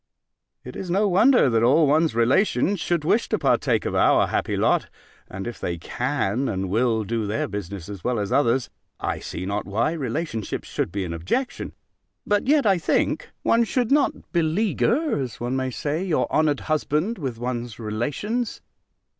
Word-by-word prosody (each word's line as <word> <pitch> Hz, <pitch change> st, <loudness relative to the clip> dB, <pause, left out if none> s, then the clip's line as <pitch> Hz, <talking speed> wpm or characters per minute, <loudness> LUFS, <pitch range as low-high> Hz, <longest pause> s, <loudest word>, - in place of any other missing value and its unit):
It -, -, -9 dB
is 185 Hz, -, -6 dB
no 200 Hz, +4 st, +2 dB
wonder, 220 Hz, -, +5 dB
that 115 Hz, -3 st, +2 dB
all 140 Hz, +7 st, +5 dB
one's 155 Hz, -1 st, +2 dB
relations 145 Hz, -, +2 dB
should 170 Hz, -2 st, -1 dB
wish 220 Hz, +8 st, +2 dB
to -, -, +1 dB
partake -, -, +1 dB
of -, -, -2 dB
our -, -, +4 dB
happy -, -, -1 dB
lot; -, -, +2 dB, 0.4 s
and 95 Hz, +1 st, -6 dB
if 120 Hz, -1 st, -6 dB
they 85 Hz, -1 st, -3 dB
can 125 Hz, -, -1 dB
and 95 Hz, -2 st, -3 dB
will 115 Hz, 0 st, +2 dB
do 110 Hz, 0 st, -2 dB
their 105 Hz, +2 st, -1 dB
business 100 Hz, -3 st, -6 dB
as 100 Hz, -4 st, -8 dB
well 125 Hz, -1 st, 0 dB
as 100 Hz, -2 st, -2 dB
others, 130 Hz, -2 st, +2 dB, 0.3 s
I -, -, -2 dB
see 90 Hz, -, -6 dB
not 100 Hz, 0 st, -3 dB
why 110 Hz, +8 st, 0 dB
relationship 140 Hz, -, -3 dB
should -, -, -3 dB
be 100 Hz, 0 st, -2 dB
an 85 Hz, -, -4 dB
objection: 90 Hz, -, -2 dB, 0.5 s
but, 205 Hz, +3 st, +1 dB
yet, 290 Hz, -1 st, +4 dB
I 195 Hz, -4 st, +4 dB
think, -, -, 0 dB
one 230 Hz, +1 st, +4 dB
should 240 Hz, +2 st, -1 dB
not 285 Hz, 0 st, +1 dB
beleaguer, 215 Hz, -, +1 dB
as 125 Hz, -3 st, -5 dB
one 120 Hz, +2 st, -2 dB
may 130 Hz, 0 st, -1 dB
say, 150 Hz, +6 st, -2 dB
your 180 Hz, -5 st, +1 dB
honoured 150 Hz, -3 st, +2 dB
husband 155 Hz, +7 st, -1 dB
with 130 Hz, -7 st, -4 dB
one's 120 Hz, -2 st, -4 dB
relations. 145 Hz, -, -3 dB
135 Hz, 175 wpm, -24 LUFS, 110-185 Hz, 0.5 s, wonder